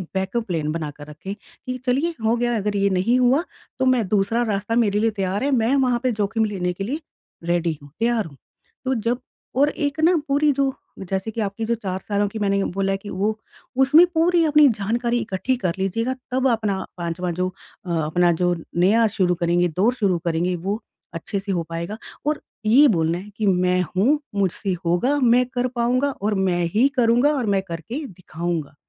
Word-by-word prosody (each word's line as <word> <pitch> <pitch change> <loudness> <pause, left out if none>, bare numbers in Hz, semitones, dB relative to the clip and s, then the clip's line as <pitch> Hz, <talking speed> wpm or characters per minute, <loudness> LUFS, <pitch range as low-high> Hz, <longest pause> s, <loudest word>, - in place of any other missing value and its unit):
Backup 190 +5 -1
plan 155 -4 -1
बना 155 -2 -3
कर 145 0 -10
रखें, 155 +6 -7
कि 255 +3 -8
चलिए 280 +7 +1
हो 225 +2 +3
गया। 240 0 0
अगर 210 0 -1
ये 200 0 +2
नहीं 235 +6 +2
हुआ 255 +6 +3 0.4
तो 260 - +2
मैं 230 -6 0
दूसरा 215 +3 +2
रास्ता 205 +3 -1
मेरे 210 -3 +2
लिए 225 0 +2
तैयार 195 +4 -1
है। 285 - +1
मैं 240 +5 +2
वहाँ 250 -3 +2
पे 255 - +2
जोखिम 220 +1 0
लेने 180 -4 -2
के 195 - -5
लिए 290 +7 -3 0.4
रेडी 170 -2 0
हूँ, 145 - -14
तैयार 230 -1 +1
हूँ। 140 -4 -12 0.5
तो 260 0 +1
जब 245 +1 +1 0.4
और 290 +2 +5
एक 290 +1 -3
ना 350 +3 +5
पूरी 290 +2 +3
जो 275 -1 +1 0.3
जैसे 190 +3 -3
कि 225 - -3
आपकी 205 +2 -3
जो 235 +1 +1
4 190 -4 -4
सालों 205 0 +1
की 220 - -6
मैंने 200 -1 +1
बोला 195 +1 -1
है 195 - -1
कि 205 +1 -10
वो, 215 +3 -1 0.4
उसमें 290 +6 +7
पूरी 340 +1 +4
अपनी 300 -1 +6
जानकारी 235 +3 0
इकट्ठी 215 +4 -1
कर 180 -8 -1
लीजिएगा। 225 +7 0 0.2
तब 260 +1 +2
अपना 210 -4 -1
5वा 175 +1 -3
जो 185 - +2 0.4
अ, - - -2
अपना 175 +3 +3
जो 175 0 +2 0.2
नया 215 +6 +4
शुरू 180 -3 +3
करेंगे, 175 +1 +2
दौर 195 +10 +2
शुरू 200 -8 +1
करेंगे 170 +2 0
वो 195 +6 -3 0.3
अच्छे 180 +4 -3
से 195 +1 -4
हो 175 -3 0
पाएगा। 170 +6 -4 0.3
और 300 0 0 0.2
ये 265 +7 +7
बोलना 165 +1 +1
है 195 +4 -9
कि 215 - -1
मैं 180 -1 +3 0.2
हूँ, 280 +10 +3 0.2
मुझसे 195 0 0
होगा, 240 +13 +2
मैं 250 0 +4
कर 250 0 0
पाऊँगा 250 +4 +1
और 210 +1 +1
मैं 175 -1 +1
ही 250 +6 +5
करूँगा 245 +5 +4
और 250 -4 -1
मैं 195 - +2
करके 225 - -5
दिखाऊँगा। 170 -4 -5
210 Hz, 200 wpm, -22 LUFS, 180-245 Hz, 0.5 s, उसमें